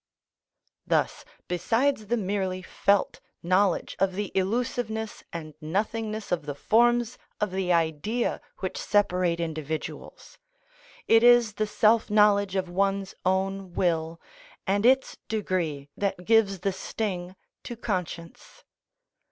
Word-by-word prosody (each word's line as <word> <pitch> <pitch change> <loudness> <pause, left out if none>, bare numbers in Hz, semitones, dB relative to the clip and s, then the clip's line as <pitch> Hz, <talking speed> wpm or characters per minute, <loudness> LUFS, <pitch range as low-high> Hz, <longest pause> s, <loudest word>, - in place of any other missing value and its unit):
Thus, - - 0 0.2
besides 225 +6 0
the 240 +3 +1
merely 190 -2 -2
felt 200 +2 +1 0.2
knowledge 185 +1 +1
of 190 0 +2
the 200 0 -3
illusiveness 220 +2 -2
and 155 -2 -7
nothingness 215 +6 -2
of 165 -4 -1
the 145 - -3
forms 240 - +2 0.2
of 210 -2 -1
the 185 -1 -1
idea 170 +8 0 0.2
which 185 - -3
separate 180 -4 +1
individuals, 160 -2 -5 0.7
it 225 0 +6
is 240 -2 +6
the 215 +1 -1
self 220 +1 +3
knowledge 205 -2 +4
of 190 -1 0
one's 195 +2 0
own 190 0 -1
will 165 -2 0 0.5
and 200 +3 +2
its 265 +1 +3
degree 175 -9 -2
that 195 -3 -2
gives 205 -4 +3
the 195 0 0
sting 185 -2 -4 0.3
to 240 - -7
conscience. 180 -6 -5
195 Hz, 120 wpm, -27 LUFS, 180-220 Hz, 0.7 s, it